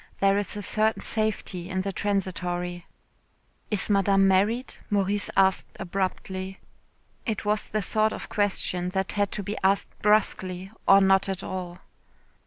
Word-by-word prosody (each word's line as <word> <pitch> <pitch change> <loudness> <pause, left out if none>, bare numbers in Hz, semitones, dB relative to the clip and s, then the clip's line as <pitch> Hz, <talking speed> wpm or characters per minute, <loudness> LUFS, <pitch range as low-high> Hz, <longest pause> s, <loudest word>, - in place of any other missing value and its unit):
There 195 0 +3
is 205 0 -2
a 205 - -4
certain 215 +3 +1
safety 200 -5 -1
in 185 0 -1
the 195 +1 -3
transitory. 180 -3 -2 0.8
Is 210 -2 +1
Madame 195 -1 +4
married? 210 +7 +2 0.2
Maurice 205 -1 0
asked 190 -1 +2
abruptly. 190 0 -3 0.7
It 220 -2 -2
was 210 +1 0
the 215 -1 -2
sort 215 +3 +2
of - - -6
question 185 -3 0
that 190 0 0
had 205 -1 0
to 210 - -3
be 205 +3 -4
asked 195 +1 +2
brusquely, 190 -3 +1 0.2
or 195 0 +8
not 195 0 +4
at 195 0 -3
all. 180 -1 -6
195 Hz, 145 wpm, -26 LUFS, 185-205 Hz, 0.8 s, or